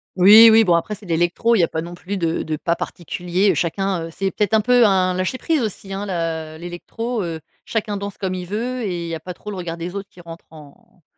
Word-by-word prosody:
Oui, 210 +5 +9
oui, 225 +1 +7
bon, 180 -5 +3
après, 170 +5 0
c'est 210 0 -15
de 175 - -6
l'électro. 175 +8 +2
Il - - +2
y - - +5
a - - +3
pas 160 - -3
non 170 +1 -8
plus 185 +3 -5
de 165 -2 -1
de 155 - -3
pas 170 +3 0
particulier, 180 +3 -1
heu. - - 0
Chacun, 185 0 -1
heu, - - -9
c'est 195 +3 -2
peut-être 210 +2 -1
un 220 - +4
peu 245 +1 +4
un 185 -3 +3
lâcher 185 +7 -2
prise 315 +1 0
aussi, 200 -3 -5
hein, 195 +1 -4
la 165 -4 -3
l'électro, 210 +7 -5
heu. 165 -2 -4 0.3
Chacun 215 -2 -2
danse 200 0 -6
comme 190 -1 -3
il 180 -1 -5
veut 240 +6 -3
et 180 -6 -3
il - - -5
y 165 - -3
a - - -6
pas 180 +3 -7
trop 210 - -8
le - - -6
regard 170 -2 -5
des 170 +2 -5
autres 200 0 -6
qui 180 - -19
rentre 170 -1 -11
en 155 +2 -17
185 Hz, 270 wpm, -21 LUFS, 170-210 Hz, 0.3 s, Oui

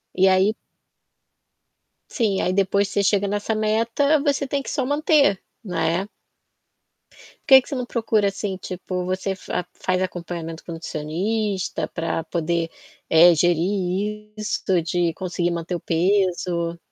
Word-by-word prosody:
E 190 +1 +4
aí 190 +3 +4 1.6
Sim, 215 -6 0
aí 185 - 0
depois 200 +1 +2
que - - -9
você 200 - +2
chega 200 0 +2
nessa 205 +2 -1
meta, 230 +8 +2
você 280 -1 +1
tem 280 +1 -1
que - - -7
só 265 - -1
manter, 290 - +3 0.2
né. 180 -1 -1 1.4
Por 270 - +9
que 265 - +9
que - - -19
você 280 - -3
não 250 -1 -2
procura, 220 -4 +1
assim, 195 0 -3
tipo, 185 0 -5
você 185 +1 -2
fa 180 -2 -4
faz 185 0 -1
acompanhamento 170 -3 -5
com - - -8
nutricionista 185 +6 -2
pra 165 -1 -3
poder, 170 0 -1 0.4
eh, 170 +2 +7
gerir 190 +5 0
isto 210 -3 0
de 170 +1 0
conseguir 180 -1 -2
manter 170 +1 -4
o - - -3
peso? 175 -1 0
190 Hz, 140 wpm, -23 LUFS, 175-210 Hz, 1.6 s, Por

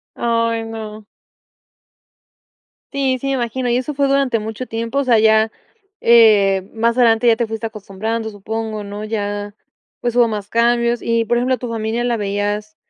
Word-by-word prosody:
Ay 230 -1 0
no. 220 -1 -8 1.9
Sí, 265 -2 0
sí 275 - -3
me 270 - 0
imagino, 245 0 -2
y 240 - +2
eso 260 +4 -3
fue 275 0 +1
durante 270 -5 +1
mucho 220 +4 -6
tiempo, 230 +4 -3
o 280 - +1
sea 245 -3 +4
ya, 220 0 +4 0.5
eh, 205 -5 +5
más 230 +2 +1
adelante 235 -1 +4
ya 225 - +5
te 235 -1 -1
fuiste 225 +1 -6
acostumbrando, 220 +2 -4
supongo, 215 +1 -5
¿no? 205 +1 -7
Ya 205 -1 -4 0.5
pues, 240 -1 -2
hubo 240 -1 +6
más 210 -3 -4
cambios 235 +1 +2
y 230 0 0
por 240 +2 0
ejemplo, 255 +1 +1
¿tu 245 0 -6
familia 225 +1 -2
la 240 -1 0
veías, 205 +1 -3
225 Hz, 165 wpm, -19 LUFS, 215-240 Hz, 1.9 s, hubo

